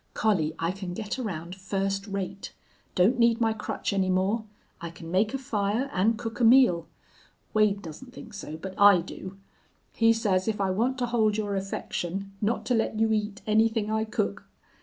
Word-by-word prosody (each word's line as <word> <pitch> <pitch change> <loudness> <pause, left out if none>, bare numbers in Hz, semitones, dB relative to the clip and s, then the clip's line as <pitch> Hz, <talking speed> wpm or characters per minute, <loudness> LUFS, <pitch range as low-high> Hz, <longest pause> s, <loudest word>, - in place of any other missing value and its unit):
"Collie, 165 -8 +1
I 165 +1 0
can 185 -2 -6
get 220 +5 -4
around 175 -7 -4
first 195 +1 -2
rate. 195 0 -5 0.4
Don't 215 +8 +3
need 235 0 +4
my 225 -1 +2
crutch 215 -1 -3
any 190 -1 +1
more. 195 +5 +1 0.4
I 170 - -4
can 165 0 -10
make 200 +4 +2
a - - 0
fire 225 +1 -1
and 215 +5 +2
cook 225 +2 -6
a - - +1
meal. 225 -9 +5 0.7
Wade 210 -2 +2
doesn't 170 - -9
think 245 -3 -11
so, 160 -6 -7
but 190 +3 -7
I 200 -3 +7
do. 190 +2 -9 0.6
He 225 0 +4
says 205 -4 +1
if 215 -2 -1
I 195 -1 +1
want 240 +7 0
to 250 - 0
hold 220 -3 +1
your 205 -2 -1
affection, 195 0 -4
not 220 +3 0
to 250 - +1
let 225 -1 0
you 225 0 +3
eat 210 -1 -2
anything 220 0 +2
I 220 0 +1
cook. 100 - -2
205 Hz, 185 wpm, -27 LUFS, 190-225 Hz, 0.7 s, I